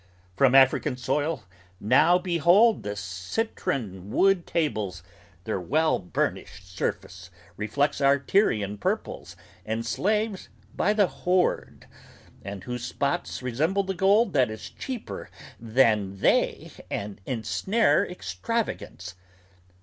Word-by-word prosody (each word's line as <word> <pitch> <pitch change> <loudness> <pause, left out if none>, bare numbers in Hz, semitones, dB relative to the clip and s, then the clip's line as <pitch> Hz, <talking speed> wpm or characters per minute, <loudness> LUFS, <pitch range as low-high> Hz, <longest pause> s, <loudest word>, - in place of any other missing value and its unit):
From 130 +5 +4
African 130 -1 +4
soil 145 +1 -1 0.4
now 135 +11 +4
behold 180 +5 +4
The 105 0 -4
citron 100 - -4
wood 190 - +2
tables; 105 - -2 0.4
their 110 -2 -2
well 155 - +1
burnished 90 0 -4
surface 90 0 -4 0.3
reflects 140 +8 -1
Our 140 0 +5
Tyrian 110 - +1
purples - - -3 0.3
and 110 +1 -3
slaves 210 - -1 0.3
by 210 - +2
the 210 -2 +4
horde, 180 0 -1 0.6
and 100 0 -7
whose 125 -1 -5
spots 140 +3 -2
Resemble 155 +11 0
the 190 0 -3
gold 200 +4 +3
that 130 -5 +3
is 110 0 -8
cheaper 255 -4 -6 0.3
than 110 -4 +2
they - - +1 0.2
and 100 -1 -5
ensnare 190 - +1
Extravagance. 190 - -4
135 Hz, 110 wpm, -26 LUFS, -, 0.6 s, Our